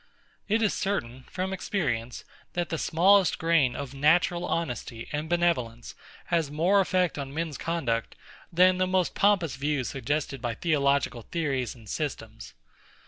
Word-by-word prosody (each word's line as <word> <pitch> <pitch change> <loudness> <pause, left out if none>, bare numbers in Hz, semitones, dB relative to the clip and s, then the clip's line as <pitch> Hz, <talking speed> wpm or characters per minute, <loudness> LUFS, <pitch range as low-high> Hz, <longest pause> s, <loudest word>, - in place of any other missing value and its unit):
It 220 +2 +2
is 210 - +2
certain, 130 -11 -3
from 190 +1 -3
experience, 125 - -2 0.3
that 175 -1 -2
the 165 - -2
smallest 190 +2 +4
grain 160 -6 +2
of 140 -1 -6
natural 170 +5 +2
honesty 125 -9 -3
and 150 +1 -3
benevolence 160 -10 0 0.4
has 165 -4 +2
more 170 +7 +3
effect 185 -4 0
on 135 -1 -5
men's 160 -2 -2
conduct, 130 -10 -2 0.4
than 180 +2 +4
the 185 - +2
most 185 -1 +1
pompous 190 -9 +2
views 140 -2 -1
suggested 135 0 -2
by 120 -2 -2
theological 140 -5 +1
theories 135 -4 -2
and 115 -3 -16
systems. 115 -6 -5
155 Hz, 140 wpm, -27 LUFS, 130-175 Hz, 0.4 s, smallest